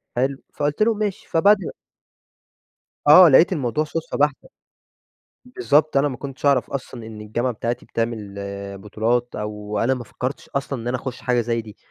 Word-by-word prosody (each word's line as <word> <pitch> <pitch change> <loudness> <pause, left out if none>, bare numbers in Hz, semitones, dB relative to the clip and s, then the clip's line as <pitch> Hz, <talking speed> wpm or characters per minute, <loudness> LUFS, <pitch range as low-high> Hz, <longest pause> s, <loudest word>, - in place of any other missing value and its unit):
حلو؟ 135 +2 0 0.2
فقُلت 145 +8 0
لهم: 225 -1 +2
"ماشي." 210 -3 -3
فبعد 200 +6 +5 1.5
آه، 175 +3 +10
لقيت 165 +7 +6
الموضوع 150 0 0
صُدفة 165 +1 -4
بحتة، 145 -1 0 1.0
بالضبط، 155 - +2
أنا 145 +2 +3
ما 130 -3 -5
كنتش 135 0 -7
أعرف 140 -3 +3
أصلًا 125 -4 -6
إن 105 -1 -9
الجامعة 120 +4 -1
بتاعتي 120 +2 -3
بتعمل 115 -3 -3 0.4
بطولات، 115 +4 -1
أو 105 0 -4
أنا 130 +3 +2
ما 125 -2 -5
فكرتش 125 +4 -5
أصلًا 135 -3 -3
إن 120 - -6
أنا 125 +1 0
أخش 130 -3 -6
حاجة 125 -1 +1
زي 115 0 -1
دي، 110 0 -13
130 Hz, 160 wpm, -22 LUFS, 115-145 Hz, 1.5 s, آه